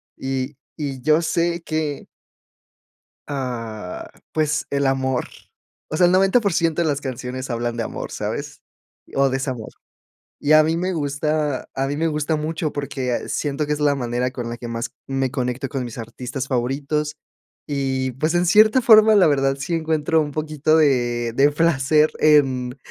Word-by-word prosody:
y 135 +1 -3 0.2
y 135 -4 -4
yo 155 +3 +3
sé 170 +1 0
que 155 -2 -2 1.2
Ah, 115 -8 -5 0.2
pues, 150 -2 0
el 140 0 0
amor, 130 -1 0 0.6
o 155 - -2
sea, 180 - +5
el 175 - +3
90% 185 -4 +2
de 165 - +1
las 145 -1 -1
canciones 130 0 -5
hablan 120 0 -2
de 115 - -2
amor, - - -5
¿sabes? - - -5 0.5
O 135 0 +3
desamor, 130 -4 -3 0.7
Y 150 - +1
a 155 0 +8
mí 160 +1 +1
me 180 +2 -1
gusta 150 -2 -1
a 135 0 -1
mí 145 - -2
me 165 +2 0
gusta 150 0 0
mucho, 155 +1 -3
porque 135 -3 -3
siento 145 0 -1
que 150 - -4
es 150 - -4
la 145 -1 +3
manera 125 0 -1
con 120 -2 -5
la 120 - -5
que 120 - -7
más 115 0 -4 0.2
me 135 -1 -1
conecto 130 0 -2
con 130 -3 -3
mis 120 0 -8
artistas 125 +4 -6
favoritos, 140 +4 -1 0.5
y 135 -2 -1
pues, 155 +6 -1
en 175 +1 +2
cierta 215 +7 +5
forma, 220 -2 +7
la 195 - +6
verdad, 135 -2 +2
sí 170 +5 -4
encuentro 160 -1 +1
un 145 -1 -3
poquito 155 0 0
de 120 -6 +2
de 140 +3 +4
placer 155 -1 +3
en 135 -4 +3
140 Hz, 165 wpm, -22 LUFS, 130-155 Hz, 1.2 s, a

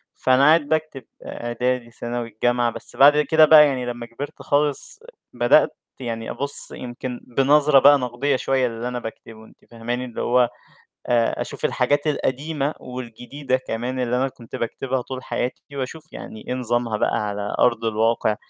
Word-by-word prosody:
فأنا 130 +1 +3
قاعد 160 +2 +6
باكتب 155 -2 -2 0.2
إعدادي، 120 0 -3
ثانوي، 120 0 -4
الجامعة، 120 +2 0
بس - - -8
بعد 145 +2 +7
كده 155 +1 +5
بقى 150 -1 +8
يعني 130 -3 -2
لمّا 120 -1 -5
كبِرت 115 +5 -8
خالص 150 - 0 0.3
بدأت - - +3 0.2
يعني 115 -3 -5
أبُصّ 140 0 -1
يمكن 125 0 -6 0.2
بنظرة 145 +1 +5
بقى 145 +1 +7
نقدية 125 +2 -1
شوية 130 0 +1
للي 115 +1 -5
أنا 125 0 -3
باكتبه، 115 -1 -10
أنتِ - - -22
فاهماني، 120 +2 -4
اللي 120 - -6
هو 125 0 +3 0.6
آآ 115 -1 +1
أشوف - - -4
الحاجات 145 +1 +1
القديمة 145 +1 -1
والجديدة 125 +2 -4
كمان 125 +1 -4
اللي 125 -1 0
أنا 135 +2 +1
كنت 120 -3 -11
باكتبها 130 +2 -2
طول 130 +1 -7
حياتي، 125 - -3 0.2
وأشوف 155 +4 -6
يعني 110 - -9
إيه - - -2
نظامها 120 -3 -1
بقى - - +1
على 100 0 -3
أرض 115 -2 +2
الواقع، 110 0 +1
125 Hz, 160 wpm, -22 LUFS, 120-140 Hz, 0.6 s, بقى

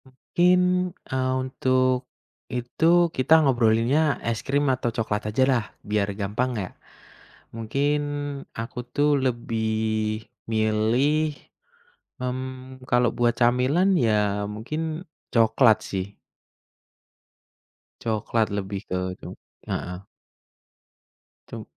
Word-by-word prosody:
Mungkin, 175 +7 +2 0.5
eee, 130 0 +1
untuk 130 -1 +1 0.4
itu, 125 +5 -2 0.3
kita 130 +4 +3
ngobrolinnya 125 +4 +3
es 115 -2 -1
krim 145 +2 +1
atau 125 -1 -1
coklat 105 -2 -2
ajalah, 130 0 +2 0.2
biar 105 -1 +1
gampang 105 +6 -1
yak. 95 -3 -5 0.8
Mungkin 140 +6 0 0.6
aku 115 +3 -6 0.2
tuh 145 +1 +3
lebih 110 -2 -1 0.3
milih, 120 +8 +1 0.9
mmm, 130 0 -5
kalau 120 -1 +3
buat 120 -1 +3
camilan, 130 +11 +3
ya 105 -4 +1
mungkin 155 - -4 0.3
coklat 115 0 +5
sih. 95 +1 -5 1.8
Coklat 110 0 0
lebih 100 -1 -3
ke 90 - -1 0.2
cu - - -8 0.4
heeh. 90 +1 -4 1.5
Cum - - -7
120 Hz, 90 wpm, -25 LUFS, 110-130 Hz, 1.8 s, coklat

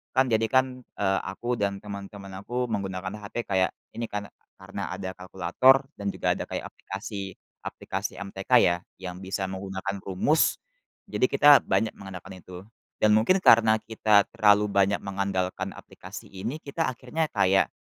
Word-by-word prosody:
kan 130 0 +5
jadikan, 125 +3 +2 0.2
eee, 95 -1 +1
aku 120 +6 -3
dan 100 -1 0
teman-teman 100 -1 -8
aku 125 +4 -2
menggunakan 95 -3 -3
HP 110 +3 -5
kayak 95 -2 +2 0.2
ini 115 -1 -4
kan, 105 0 -4 0.3
karena 100 +1 -6
ada 95 0 -5
kalkulator 95 - +3
dan 100 0 -4
juga - - 0
ada - - -4
kayak - - -4
aplikasi 95 0 -7 0.2
aplikasi - - -5
MTK 100 +2 -8
ya, 85 - +4 0.2
yang 90 -1 -7
bisa 95 +1 -3
menggunakan 95 +1 -4
rumus. 100 - +2 0.5
Jadi, 130 - +1
kita 145 +1 +7
banyak 110 -1 +1
mengandalkan 95 -1 -9
itu 90 +1 -11 0.3
dan 105 0 +4
mungkin 115 - +4
karena 110 -9 +6
kita 110 -2 +3
terlalu 105 -2 +5
banyak 100 0 +2
mengandalkan 95 -1 -2
aplikasi - - -11
ini, 110 +10 -4
kita 160 +3 -2
akhirnya 130 +6 -2
kayak 95 -2 +3
100 Hz, 150 wpm, -26 LUFS, 95-115 Hz, 0.5 s, kita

